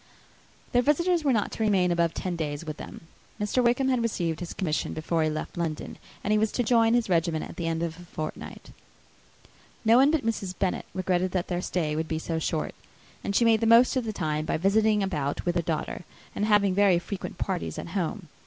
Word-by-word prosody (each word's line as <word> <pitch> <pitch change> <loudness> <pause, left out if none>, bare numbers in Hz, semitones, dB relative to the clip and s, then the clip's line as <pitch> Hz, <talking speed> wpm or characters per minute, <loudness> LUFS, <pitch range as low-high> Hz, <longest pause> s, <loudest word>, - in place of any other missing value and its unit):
Their 245 - +4
visitors 340 +5 +2
were 280 - +3
not 220 -4 +1
to - - -6
remain 190 -4 +3
above 170 -1 +1
ten 180 -2 -3
days 150 -1 -4
with 155 -1 -5
them. - - -10 0.3
Mr. 210 +5 +1
Wickham 245 +3 +2
had 255 -2 +2
received 175 -8 -1
his 175 -1 -6
commission 160 -5 -1
before 160 +1 -1
he 155 - +2
left 155 +3 -5
London, 160 -3 -4 0.2
and 210 - -1
he 215 - +4
was 220 0 +1
to 245 - +1
join 230 0 +4
his 240 -2 +1
regiment 165 -3 0
at - - -11
the 170 - -3
end 165 0 -1
of 165 -1 -3
a 175 - -11
fortnight. 155 -2 -7 1.1
No 225 +2 +6
one 270 +3 +6
but 310 -6 +1
Mrs. 195 -5 -2
Bennet 190 -2 -1
regretted 185 -1 0
that 180 -2 -1
their 175 -1 -1
stay 160 -5 -1
would 160 +1 -2
be 160 - -2
so 160 0 -2
short; 160 0 -2 0.5
and 200 - -2
she 235 - +4
made 225 -1 +4
the 225 - +2
most 235 +3 +6
of 255 -3 0
the 220 - -2
time 155 -6 -2
by - - -1
visiting 210 +3 +3
about 150 -7 -2
with 175 - +1
her 175 - +1
daughter, 160 +1 -3 0.3
and 205 - -1
having 205 -3 +4
very 195 -2 +4
frequent 185 +3 -5
parties 185 -3 -3
at - - -6
home. 185 +1 -3
185 Hz, 220 wpm, -27 LUFS, 165-220 Hz, 1.1 s, No